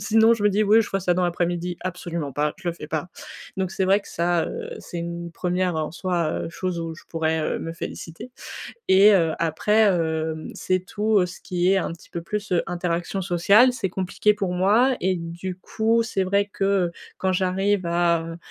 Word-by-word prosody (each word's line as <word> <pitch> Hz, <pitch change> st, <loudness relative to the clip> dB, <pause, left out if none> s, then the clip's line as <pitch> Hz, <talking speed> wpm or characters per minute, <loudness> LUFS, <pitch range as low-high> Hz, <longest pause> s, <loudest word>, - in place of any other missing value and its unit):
sinon 225 Hz, +3 st, +5 dB
je 220 Hz, -, -5 dB
me 210 Hz, -, +5 dB
dis: 205 Hz, +2 st, +2 dB
«Oui 215 Hz, +2 st, +6 dB
je 205 Hz, -, -7 dB
ferais 195 Hz, -, -1 dB
ça 180 Hz, -1 st, +1 dB
dans 180 Hz, 0 st, +1 dB
l'après-midi», 175 Hz, 0 st, -1 dB
absolument 170 Hz, -5 st, -4 dB
pas, 150 Hz, +1 st, 0 dB
je 185 Hz, -2 st, -4 dB
le 170 Hz, -, -1 dB
fais 150 Hz, -, -9 dB
pas. 155 Hz, +2 st, -3 dB, 0.5 s
Donc 190 Hz, -2 st, -1 dB
c'est 190 Hz, 0 st, -1 dB
vrai 195 Hz, +2 st, +4 dB
que -, -, -15 dB
ça, 170 Hz, 0 st, +1 dB
heu, 475 Hz, 0 st, -6 dB
c'est 175 Hz, -, -7 dB
une 170 Hz, 0 st, -5 dB
1re 180 Hz, 0 st, -1 dB
en 155 Hz, -1 st, -2 dB
soi, 175 Hz, -2 st, -1 dB
heu, -, -, -3 dB
chose 180 Hz, 0 st, -3 dB
où 165 Hz, -1 st, -4 dB
je 160 Hz, -, -14 dB
pourrais, 160 Hz, -1 st, 0 dB
heu, -, -, -1 dB
me 165 Hz, -, -5 dB
féliciter. 165 Hz, +6 st, -7 dB, 0.6 s
Et 195 Hz, +3 st, +7 dB
heu, 165 Hz, -4 st, +3 dB
après, 165 Hz, +6 st, +1 dB, 0.2 s
hem, 160 Hz, -1 st, -2 dB
c'est 185 Hz, 0 st, 0 dB
tout 210 Hz, -1 st, +2 dB
ce 175 Hz, -, -10 dB
qui 180 Hz, +1 st, +1 dB
est -, -, +3 dB
un 170 Hz, -, -2 dB
petit 170 Hz, -, -14 dB
peu 170 Hz, -, -5 dB
plus 205 Hz, +2 st, -4 dB
interaction 175 Hz, +2 st, -2 dB
sociale, 200 Hz, +8 st, +5 dB
c'est 245 Hz, -6 st, -2 dB
compliqué 190 Hz, +3 st, +1 dB
pour 195 Hz, -3 st, -2 dB
moi 220 Hz, +8 st, +3 dB
et 185 Hz, +1 st, +1 dB
du 175 Hz, +2 st, -5 dB
coup, 225 Hz, +4 st, +1 dB
c'est 195 Hz, -4 st, -1 dB
vrai 200 Hz, +2 st, +2 dB
que, 195 Hz, -, -2 dB
heu, 195 Hz, -3 st, +2 dB, 0.3 s
quand 190 Hz, 0 st, +1 dB
j'arrive 190 Hz, +1 st, +1 dB
à, 170 Hz, -1 st, +2 dB
heu, 165 Hz, 0 st, -7 dB
180 Hz, 210 wpm, -24 LUFS, 170-200 Hz, 0.6 s, Et